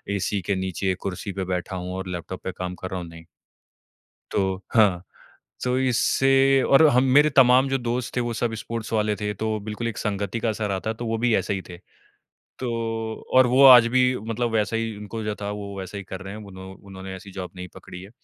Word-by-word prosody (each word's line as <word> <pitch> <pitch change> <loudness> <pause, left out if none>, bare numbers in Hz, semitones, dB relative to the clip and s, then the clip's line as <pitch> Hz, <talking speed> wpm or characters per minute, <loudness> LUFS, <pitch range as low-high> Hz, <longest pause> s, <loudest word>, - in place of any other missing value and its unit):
AC 100 +1 -1
के 100 +2 -1
नीचे 95 0 -1
कुर्सी 100 +1 -4
पे 95 - -3
बैठा 90 +2 -3
हूँ 90 0 -5
और 95 0 -5
लैपटॉप 90 +1 -6
पे 95 - -3
काम 90 0 -4
कर 95 - -3
रहा 95 - -3
हूँ, 85 - -7
नहीं। 85 0 -13 1.1
तो 95 -1 -1
हाँ, 100 -6 +4 0.6
तो 125 0 +1
इससे 135 +1 +3
और 140 +3 +6
हम 125 -1 +4
मेरे 150 +1 +6
तमाम 130 0 +5
जो 135 - +1
दोस्त 120 0 -3
थे 125 - +1
वो 120 -1 -2
सब 115 0 -1
स्पोर्ट्स 115 +2 -5
वाले 105 -1 +1
थे, 105 0 -3
तो 110 +1 -2
बिल्कुल 110 +3 -4
एक 115 - -5
संगति 100 +2 -2
का 115 - 0
असर 105 -1 -2
आता 95 +3 -2
है, 110 - -2
तो 120 - -6
वो 115 0 -1
भी 120 -2 +3
ऐसे 95 - 0
ही 95 - -3
थे। 90 - -9 0.8
तो 125 -2 -3 0.6
और 130 -1 +7
वो 130 +3 +5
आज 125 -3 +9
भी 130 - +5 0.3
मतलब 120 +1 -1
वैसा 110 0 +1
ही 115 -1 -2
उनको 105 +2 -6
जो 105 -1 -2
था 100 0 -3
वो 100 -1 -6
वैसा 95 +1 -7
ही - - -6
कर 95 0 -6
रहे 100 +1 -7
हैं, 110 - -8
उन्हों 95 -1 -10
उन्होंने 95 -1 -9
ऐसी 95 +1 -12
जॉब 95 -1 -6
नहीं 90 0 -7
पकड़ी 90 - -10
है। 100 - -12
105 Hz, 225 wpm, -24 LUFS, 95-120 Hz, 1.1 s, आज